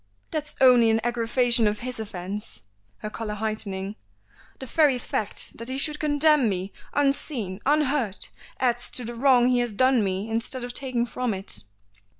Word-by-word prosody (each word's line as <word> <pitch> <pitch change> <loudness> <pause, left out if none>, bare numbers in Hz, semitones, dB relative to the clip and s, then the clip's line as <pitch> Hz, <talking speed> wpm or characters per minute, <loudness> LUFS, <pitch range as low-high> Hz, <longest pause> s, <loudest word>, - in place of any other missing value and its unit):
"That's 300 -1 -3
only 250 -3 +6
an 225 0 +3
aggravation 235 0 +3
of 210 0 -2
his 250 -1 -4
offence," 200 - -6 0.4
her 215 - -3
color 215 -2 -4
heightening; 210 -2 -3 0.6
"the 265 - -8
very 285 0 +3
fact 220 -4 -1
that 230 +2 -5
he 260 - -3
should 300 +2 -1
condemn 300 -4 +3
me 190 0 -4 0.2
unseen, 275 -8 -1
unheard, 280 -8 0 0.3
adds 245 -1 +1
to 250 - -3
the 240 - -6
wrong 250 0 +4
he 250 -1 +3
has 240 -1 -1
done 255 +2 +3
me 195 +2 -2
instead 230 +3 -2
of 245 0 -6
taking 250 -3 0
from 245 -2 -2
it." 190 - -1
240 Hz, 160 wpm, -25 LUFS, 210-260 Hz, 0.6 s, only